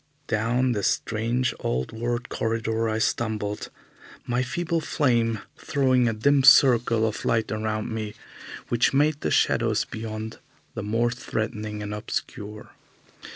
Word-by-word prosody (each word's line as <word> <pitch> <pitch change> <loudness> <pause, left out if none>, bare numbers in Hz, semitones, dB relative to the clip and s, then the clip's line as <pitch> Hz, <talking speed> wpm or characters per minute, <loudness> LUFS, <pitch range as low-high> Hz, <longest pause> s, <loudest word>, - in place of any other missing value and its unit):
Down 120 +3 +1
this 105 -4 0
strange, 115 +3 0
old 65 +1 -2
world 120 +1 -3
corridor 115 0 -1
I 110 - -1
stumbled, 110 -2 -1 0.6
my 120 +1 0
feeble 170 +5 -1
flame 115 -8 +1 0.2
throwing 130 -3 +2
a 115 - +1
dim 140 +6 +3
circle 115 -4 +6
of 110 - -4
light 115 -1 +1
around 110 +1 -2
me, 110 -1 -4 0.5
which 120 +3 +2
made 150 +1 +2
the - - 0
shadows - - +2
beyond 110 0 -6 0.3
the - - -4
more 115 +3 +1
threatening 110 -3 -4
and 105 0 -4
obscure. 105 0 -5
115 Hz, 130 wpm, -25 LUFS, 110-125 Hz, 0.6 s, circle